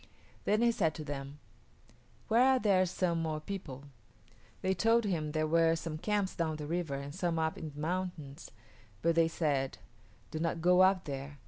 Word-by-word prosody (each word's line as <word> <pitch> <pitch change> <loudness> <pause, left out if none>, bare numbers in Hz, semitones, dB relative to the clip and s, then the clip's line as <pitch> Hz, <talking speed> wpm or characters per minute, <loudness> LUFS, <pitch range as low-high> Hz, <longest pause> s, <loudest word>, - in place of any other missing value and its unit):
Then 215 +3 +2
he 235 - +5
said 160 -8 0
to 155 - -6
them, 140 -1 -6 0.9
"Where 230 +2 +4
are 260 +1 +5
there 190 -4 +3
some 170 -2 0
more 155 -1 -2
people?" 155 -6 -7 0.8
They 190 0 +2
told 225 +5 +3
him 165 -6 -1
there 155 0 0
were 165 +1 +3
some 160 -1 -5
camps 200 +1 0
down 160 -3 -1
the 150 -1 -6
river 165 -2 -2
and 140 +1 -6
some 175 -1 -1
up 160 0 0
in 160 - -6
the 145 0 -11
mountains, 170 -3 -4 0.5
but 170 0 +3
they 165 0 +4
said, 145 -5 -1 0.5
"Do 155 - -4
not 165 0 -1
go 180 +2 +5
up 190 0 +4
there. 140 0 -6
165 Hz, 185 wpm, -32 LUFS, 155-185 Hz, 0.9 s, he